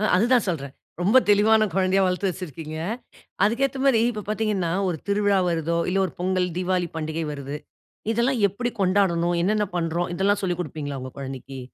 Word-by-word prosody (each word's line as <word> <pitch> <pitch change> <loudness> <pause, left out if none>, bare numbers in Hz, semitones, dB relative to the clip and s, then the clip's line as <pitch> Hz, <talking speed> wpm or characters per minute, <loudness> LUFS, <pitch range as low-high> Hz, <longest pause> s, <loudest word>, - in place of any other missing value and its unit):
அதுதான் 240 +4 +3
சொல்றேன், 140 -5 -4 0.3
ரொம்ப 210 +8 +5
தெளிவான 215 +1 +5
குழந்தையா 190 0 +2
வளர்த்து 185 +1 0
வச்சிருக்கிங்க, 155 -3 -7 0.7
அதுக்கு 235 +6 +2
ஏத்த 265 0 -6
மாதிரி 235 -5 +4
இப்போ 210 -3 -6
பார்த்தீங்கனா, 210 -6 0 0.2
ஒரு 160 -4 -3
திருவிழா 200 -1 +3
வருதோ, 165 0 0
இல்ல 195 - +1
ஒரு - - -6
பொங்கல் 185 0 +1
தீவாளி 180 -2 0
பண்டிகை 160 +1 -3
வருது, 140 0 -5 0.6
இதெல்லாம் 235 0 +1
எப்படி 240 +5 -3
கொண்டாடனும், 180 -3 +2
என்னென்ன 210 +2 +1
பண்ணுறோம், 170 +1 -1
இதெல்லாம் 205 +2 +1
சொல்லிக் 180 -1 -1
கொடுப்பீங்களா 145 -3 -5
உங்க 130 0 -7
குழந்தைக்கு? 135 0 -7
185 Hz, 160 wpm, -24 LUFS, 165-210 Hz, 0.7 s, ரொம்ப